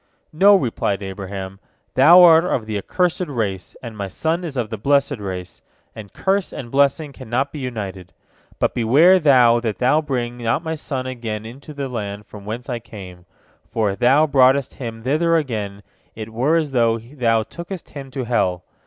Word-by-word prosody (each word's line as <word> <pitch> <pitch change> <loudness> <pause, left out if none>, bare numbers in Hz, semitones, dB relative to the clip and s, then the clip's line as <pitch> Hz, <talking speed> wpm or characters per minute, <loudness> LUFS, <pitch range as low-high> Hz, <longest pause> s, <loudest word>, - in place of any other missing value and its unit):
"No," 200 +6 +6
replied 110 - -1
Abraham, 95 0 -7 0.3
"thou 175 +3 +8
art 165 -1 +7
of 130 -10 -1
the 110 -1 -4
accursed 180 - -1
race, 105 -9 -4
and 115 -2 -7
my 100 -2 -4
son 160 - -2
is 155 -6 -6
of 115 -3 -2
the 110 - -3
blessed 140 +3 +1
race, 95 -3 -7 0.3
and 105 -3 -10
curse 195 0 -1
and 120 -3 -8
blessing 140 +1 +1
cannot 130 +1 -2
be 150 - -7
united. 100 -8 -6 0.5
But - - 0
beware 145 +11 +5
thou 125 -7 +5
that 115 -3 -3
thou 140 +5 +3
bring 125 -5 -3
not 115 +7 -1
my 160 -1 -3
son 135 -4 -4
again 115 -4 -5
unto 130 +7 -11
the 140 -2 -4
land 105 -4 -5
from 100 -2 -12
whence 115 +4 -6
I 120 -3 -3
came, 95 -6 -12 0.4
for 110 -3 0
if 95 - -8
thou 140 +5 +4
broughtest 135 -2 +3
him 115 -3 -7
thither 160 +6 +2
again, 105 -9 -3 0.3
it 110 0 -7
were 135 +8 +1
as 155 -4 -1
though 115 -3 +2
thou 115 -2 0
tookest 170 - -9
him 135 -2 -8
to 130 0 -4
hell. 90 -7 0
120 Hz, 180 wpm, -20 LUFS, 110-145 Hz, 0.5 s, thou